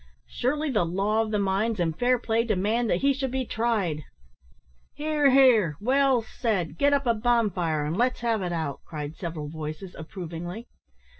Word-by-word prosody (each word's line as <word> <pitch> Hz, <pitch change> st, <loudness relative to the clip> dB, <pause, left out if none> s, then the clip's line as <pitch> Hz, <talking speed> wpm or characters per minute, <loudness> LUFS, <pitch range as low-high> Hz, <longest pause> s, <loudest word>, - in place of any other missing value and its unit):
Surely 295 Hz, +4 st, -1 dB
the 210 Hz, -7 st, +2 dB
law 195 Hz, +6 st, +1 dB
of 225 Hz, -, -2 dB
the 215 Hz, -, 0 dB
mines 200 Hz, +2 st, 0 dB
and 165 Hz, -2 st, 0 dB
fair 250 Hz, +4 st, +2 dB
play 230 Hz, -1 st, 0 dB
demand 220 Hz, +2 st, 0 dB
that 175 Hz, -, +1 dB
he 280 Hz, 0 st, +4 dB
should 270 Hz, 0 st, -2 dB
be 260 Hz, 0 st, -2 dB
tried!" 215 Hz, -10 st, -1 dB, 0.9 s
"Hear! 300 Hz, -1 st, +2 dB
hear! 240 Hz, -, +5 dB
well 265 Hz, +1 st, +3 dB
said. 205 Hz, -, -2 dB
Git 285 Hz, 0 st, +4 dB
up 280 Hz, -1 st, +2 dB
a 235 Hz, -, +3 dB
bonfire, 205 Hz, -10 st, +1 dB
and 155 Hz, +3 st, -2 dB
let's 245 Hz, +4 st, +1 dB
have 230 Hz, -3 st, 0 dB
it 180 Hz, -1 st, -2 dB
out," 160 Hz, -4 st, -3 dB
cried 150 Hz, -1 st, -6 dB
several 165 Hz, -4 st, -5 dB
voices, 155 Hz, +4 st, -6 dB
approvingly. 175 Hz, +4 st, -7 dB
215 Hz, 170 wpm, -26 LUFS, 170-245 Hz, 0.9 s, hear